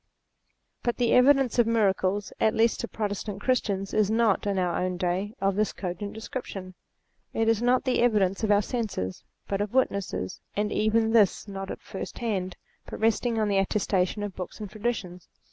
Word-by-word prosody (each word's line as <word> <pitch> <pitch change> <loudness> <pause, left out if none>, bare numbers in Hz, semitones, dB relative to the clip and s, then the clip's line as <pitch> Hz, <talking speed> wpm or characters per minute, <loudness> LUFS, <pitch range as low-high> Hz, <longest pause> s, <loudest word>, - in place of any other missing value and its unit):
But 240 - -1
the 240 -2 +2
evidence 265 -1 +5
of 235 - +5
miracles, 205 -3 +1
at 220 - +3
least 230 +1 +3
to - - -3
Protestant 205 -1 -4
Christians, 205 -5 0
is 215 -2 +3
not, 220 -2 +2
in 200 -1 0
our 180 -2 0
own 180 0 -1
day, 185 +5 -1
of 195 0 +1
this 215 +1 +1
cogent 200 +2 -5
description. 205 -5 -6 0.6
It 225 - +1
is 225 -1 +3
not 250 +1 +3
the 255 -3 +1
evidence 210 -4 +2
of 215 - +1
our 205 0 +4
senses, 205 - -3 0.2
but 195 0 -1
of 205 +3 -3
witnesses, 200 - -1
and 210 0 0
even 220 +1 +2
this 215 -2 +3
not 195 -1 -6
at - - -6
first 190 - -7
hand, 190 -6 -2 0.3
but - - -7
resting 225 +1 +1
on 215 - +2
the 200 -1 +2
attestation 195 0 0
of 205 -2 -5
books 185 +3 -7
and 210 -3 -6
traditions. 205 -6 -4
205 Hz, 180 wpm, -27 LUFS, 195-225 Hz, 0.6 s, evidence